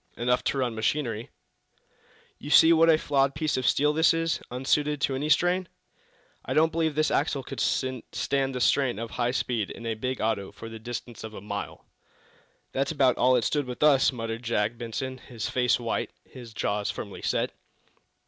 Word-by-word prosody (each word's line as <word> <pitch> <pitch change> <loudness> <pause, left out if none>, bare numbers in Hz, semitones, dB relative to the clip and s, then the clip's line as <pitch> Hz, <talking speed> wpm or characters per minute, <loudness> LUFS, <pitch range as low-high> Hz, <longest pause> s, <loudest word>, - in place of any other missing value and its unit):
"Enough 125 +1 +1
to - - 0
run 125 -3 0
machinery." 115 0 -1 1.1
"You 145 - -8
see 160 +2 +7
what 165 0 +5
a 160 - +6
flawed 140 -2 +1
piece 155 0 0
of 130 -1 -1
steel 150 +1 +3
this 160 +1 +4
is 165 -2 -1
unsuited 145 +4 0
to 135 - +1
any 145 +3 -2
strain? 180 +3 +2 0.8
I - - -3
don't 160 +1 +4
believe 160 -2 0
this 155 0 +2
axle 140 -2 0
could - - -7
stand 130 +1 -1
the 125 - -2
strain 120 +2 +2
of 115 0 -5
high 120 -1 0
speed 120 -4 -1
in 115 - -9
a 115 - 0
big 125 +4 -3
auto 105 -3 -1
for 115 +3 -9
the 115 0 -8
distance 120 +1 -7
of 110 -1 -8
a - - -6
mile." 100 0 -6 0.9
"That's 135 +2 -1
about 135 -5 +2
all 130 +1 +5
it 120 - +2
stood 145 -3 0
with 125 +3 -4
us," 145 -3 +5
muttered 115 -2 -4
Jack 115 -1 0
Benson, 125 +3 -5
his 115 -4 -6
face 125 -1 +2
white, 115 -1 -2 0.2
his 120 -3 -11
jaws 105 -1 -1
firmly - - -6
set. - - 0
130 Hz, 185 wpm, -27 LUFS, 115-145 Hz, 1.1 s, see